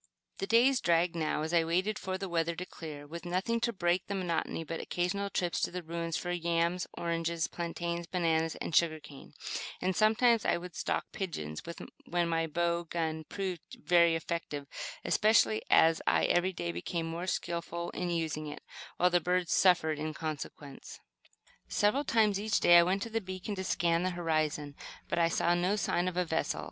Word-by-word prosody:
The 195 - -2
days 245 +4 +4
dragged 170 0 +2
now, 155 -2 -1
as 160 +2 -3
I 170 -1 +5
waited 185 +6 0
for 185 0 -3
the 195 +1 -4
weather 170 -1 0
to 180 - -5
clear, 150 -5 -8
with 170 +3 -8
nothing 185 +6 0
to 235 0 0
break 175 -3 0
the 200 - -2
monotony 170 -3 -2
but 165 +1 -5
occasional 190 +3 -1
trips 175 -3 -1
to - - +1
the 180 0 -5
ruins 165 0 -3
for 175 - -3
yams, 170 +1 0
oranges, 165 -1 -1
plantains, 170 0 -4
bananas 165 -3 +1
and 160 - -4
sugar 160 -1 +3
cane; 150 -2 -13 0.5
and 185 0 0
sometimes 225 +1 +4
I - - +2
would 175 0 -9
stalk - - -1
pigeons, 80 - -4 0.5
when 175 0 +1
my 165 -1 0
bow 170 +1 0
gun 160 -1 -3
proved 185 -3 -5
very 170 -1 +4
effective, 160 -3 -4 0.4
especially 120 - +4
as 165 0 +5
I - - +4
every 180 +2 +2
day 85 - -3
became 165 - -3
more 165 +2 -4
skillful 170 -1 -3
in 180 -1 -3
using 160 -2 -2
it, 145 - -8 0.3
while 180 +1 +3
the 175 0 +3
birds 180 0 +1
suffered 160 -5 +4
in 155 0 -3
consequence. 150 -3 -7 0.7
Several 210 +8 +2
times 215 -5 +3
each 215 0 +1
day 175 0 +8
I - - +8
went 190 +3 +1
to 230 - -7
the 225 0 0
beacon 185 +1 -5
to 190 -1 -4
scan 170 -2 +1
the 185 - +1
horizon; 155 -4 -1 0.3
but - - -1
I 165 0 +4
saw 170 +1 +2
no 180 +3 +1
sign 180 -3 0
of 180 -1 -3
a 180 - +2
vessel. 160 - -1
170 Hz, 185 wpm, -31 LUFS, 165-185 Hz, 0.7 s, day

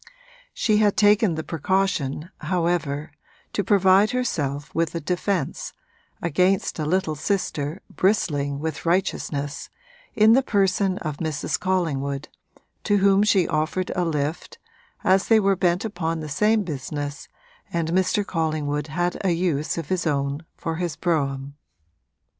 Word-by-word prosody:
She 215 -3 +2
had 210 -1 +3
taken 205 -3 +4
the 160 - -3
precaution, 165 -2 -1
however, 165 -4 -1 0.4
to 205 - 0
provide 195 +1 +5
herself 150 - -2
with 165 0 0
a - - 0
defence, 180 0 -2 0.5
against 180 +3 +1
a 150 - -1
little 185 -1 +1
sister 155 -1 -2
bristling 145 -8 0
with 155 0 -4
righteousness, 160 -5 -1 0.5
in 220 +1 +6
the 265 - +5
person 195 -4 +1
of 155 -7 -4
Mrs. 155 -3 -2
Collingwood, 150 -7 -1 0.6
to 205 - +3
whom 195 0 +4
she 200 -4 +3
offered 155 +4 -1
a 180 - +1
lift, 155 0 -2 0.5
as 190 +1 +3
they 225 -1 +6
were 195 -1 +3
bent 180 +2 +1
upon 165 -6 -2
the 155 -1 -6
same 210 +8 +2
business 145 -2 -5 0.4
and 165 -1 -1
Mr. 190 +3 +1
Collingwood 155 -4 -1
had 175 +5 -2
a 190 - +2
use 165 -4 -1
of 165 -3 -5
his 180 -2 0
own 140 +1 -1
for 165 -1 -3
his 175 -3 -2
brougham. 140 -5 -1
170 Hz, 135 wpm, -24 LUFS, 150-195 Hz, 0.6 s, in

